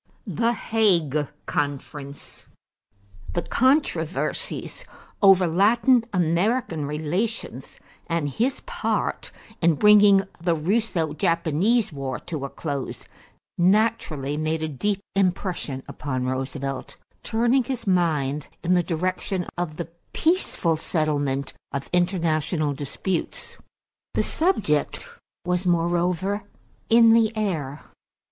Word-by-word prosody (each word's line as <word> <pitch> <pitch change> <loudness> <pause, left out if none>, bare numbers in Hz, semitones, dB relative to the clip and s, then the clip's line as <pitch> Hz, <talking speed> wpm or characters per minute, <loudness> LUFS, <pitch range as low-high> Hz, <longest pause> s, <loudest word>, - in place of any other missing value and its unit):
=The 235 0 +1
Hague 170 - +1 0.2
Conference.= 140 0 -5 0.9
The 175 - -1
controversies 260 - 0 0.4
over 195 -2 +7
Latin 225 +8 +4
American 175 - +1
relations 170 +10 -3 0.3
and 165 -3 0
his 245 - -1
part - - -2 0.3
in 170 -2 +4
bringing 205 +1 +6 0.2
the 170 -1 +2
Russo 170 -2 0
Japanese 170 +6 +1
War 135 -2 -3
to 150 -5 -5
a - - -5
close 140 -4 -5 0.5
naturally 175 -8 +1
made 155 +1 -1
a - - 0
deep 195 +8 -1
impression 180 -7 -1
upon 130 -3 -3
Roosevelt, 130 +1 -4 0.3
turning 240 +3 +2
his 260 -1 -4
mind 150 -7 +1 0.2
in 180 +1 +2
the 180 - +4
direction 180 +2 -2
of 175 -3 -3
the 170 - -4 0.3
peaceful 315 - +1
settlement 145 -4 -1 0.2
of 140 -1 -5
international 165 -4 +1
disputes. 150 +6 -4 0.6
The - - +2
subject 215 - 0 0.4
was 180 +1 0
moreover 175 +3 +1 0.5
in 230 0 +7
the 225 -1 +4
air. 155 -9 -2
175 Hz, 100 wpm, -24 LUFS, 150-205 Hz, 0.9 s, over